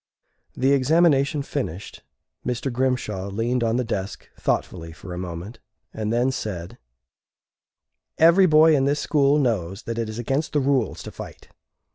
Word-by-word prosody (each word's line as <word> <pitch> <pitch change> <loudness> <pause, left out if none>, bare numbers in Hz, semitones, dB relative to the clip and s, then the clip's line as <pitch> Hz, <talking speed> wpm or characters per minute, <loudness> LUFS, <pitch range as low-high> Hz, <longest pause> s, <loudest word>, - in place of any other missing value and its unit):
The 135 +2 +2
examination 140 0 +3
finished, 105 - -5 0.4
Mr. 125 +1 -2
Grimshaw 120 -6 -1
leaned 120 +4 -1
on 115 0 +1
the 125 - +1
desk 100 -4 -5
thoughtfully 80 -2 -2
for 90 +3 -9
a - - -6
moment 90 +5 -7 0.3
and 110 -1 -3
then 120 +3 +2
said: 95 -9 -6 1.4
"Every 170 +4 +6
boy 155 0 +6
in 135 -1 +2
this 145 +1 +1
school 145 -1 +2
knows 105 - -1
that 115 0 -4
it 115 -2 -2
is 110 - -6
against 135 +6 -2
the 150 - +3
rules 135 -1 0
to - - -8
fight. - - -10
125 Hz, 150 wpm, -23 LUFS, 105-140 Hz, 1.4 s, Every